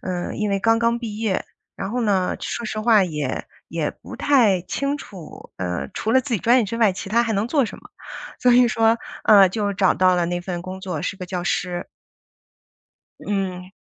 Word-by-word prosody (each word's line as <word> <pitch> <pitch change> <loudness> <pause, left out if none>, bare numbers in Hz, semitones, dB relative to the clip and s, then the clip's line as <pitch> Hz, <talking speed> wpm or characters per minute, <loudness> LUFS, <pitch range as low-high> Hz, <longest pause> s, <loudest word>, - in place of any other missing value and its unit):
呃， 180 -1 -3
因 210 -1 -1
为 195 - +1
刚 225 +2 +3
刚 235 0 +1
毕 220 -3 -6
业。 215 -4 -1 0.3
然 - - -4
后 250 - -1
呢， 195 -4 +1
说 235 - -4
实 215 - -4
话 215 -3 +5
也 150 -6 -3 0.2
也 - - -2
不 - - -9
太 230 -10 +3
清 280 +9 -2
楚， 185 - -11
呃， 90 -7 -3
除 220 - -1
了 260 - +5
自 250 -2 -3
己 200 - -1
专 245 +3 +4
业 230 - +2
之 220 +4 -4
外， 220 -5 +3
其 190 - -7
他 235 +3 +3
还 230 -1 -1
能 210 +2 -1
做 275 -1 +2
什 - - -9
么。 - - -16 0.5
所 250 -1 +4
以 245 0 +6
说， 225 +1 +2 0.3
啊， 200 -3 +7
就 205 +1 -2
找 190 -1 +3
到 185 -1 +4
了 175 -1 +1
那 175 +1 -2
份 175 -1 -4
工 185 +1 -7
作， 180 -5 -4
是 195 - -3
个 185 - -6
教 180 -1 -3
师。 175 0 -2 1.4
嗯。 185 -2 -3
200 Hz, 225 characters per minute, -22 LUFS, 185-230 Hz, 1.4 s, 啊